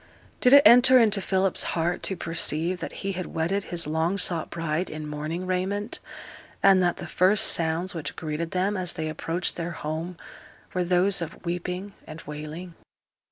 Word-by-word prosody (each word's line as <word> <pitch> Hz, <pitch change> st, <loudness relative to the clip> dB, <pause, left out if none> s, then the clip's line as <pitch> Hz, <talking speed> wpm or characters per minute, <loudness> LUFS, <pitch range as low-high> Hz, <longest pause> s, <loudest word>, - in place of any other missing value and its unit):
Did 250 Hz, -, +4 dB
it 285 Hz, 0 st, +9 dB
enter 250 Hz, +1 st, +8 dB
into 215 Hz, -4 st, +3 dB
Philip's 190 Hz, -1 st, +1 dB, 0.2 s
heart 170 Hz, +2 st, 0 dB
to 190 Hz, -, -2 dB
perceive 165 Hz, +1 st, -1 dB
that -, -, -5 dB
he 195 Hz, -, 0 dB
had 185 Hz, -1 st, -5 dB
wedded 185 Hz, +5 st, -2 dB
his 170 Hz, -1 st, -2 dB
long 160 Hz, +5 st, 0 dB
sought 175 Hz, -4 st, +1 dB
bride 165 Hz, +1 st, -2 dB
in 155 Hz, 0 st, -6 dB
mourning 155 Hz, +4 st, -4 dB
raiment, 190 Hz, +4 st, -2 dB, 0.6 s
and 195 Hz, -1 st, +6 dB
that 175 Hz, -1 st, +1 dB
the -, -, -7 dB
first 190 Hz, +3 st, +3 dB
sounds 165 Hz, +2 st, +1 dB
which 165 Hz, -4 st, -5 dB
greeted 160 Hz, +1 st, -4 dB
them 190 Hz, +4 st, 0 dB
as 185 Hz, -2 st, -2 dB
they 160 Hz, -2 st, -3 dB
approached 165 Hz, +3 st, -3 dB
their 170 Hz, 0 st, -4 dB
home 160 Hz, +3 st, -5 dB, 0.6 s
were 180 Hz, -, 0 dB
those 180 Hz, +2 st, +2 dB
of 170 Hz, -, -7 dB
weeping 180 Hz, +3 st, -4 dB
and 160 Hz, +1 st, -9 dB
wailing? 155 Hz, +4 st, -8 dB
175 Hz, 170 wpm, -25 LUFS, 160-190 Hz, 0.6 s, it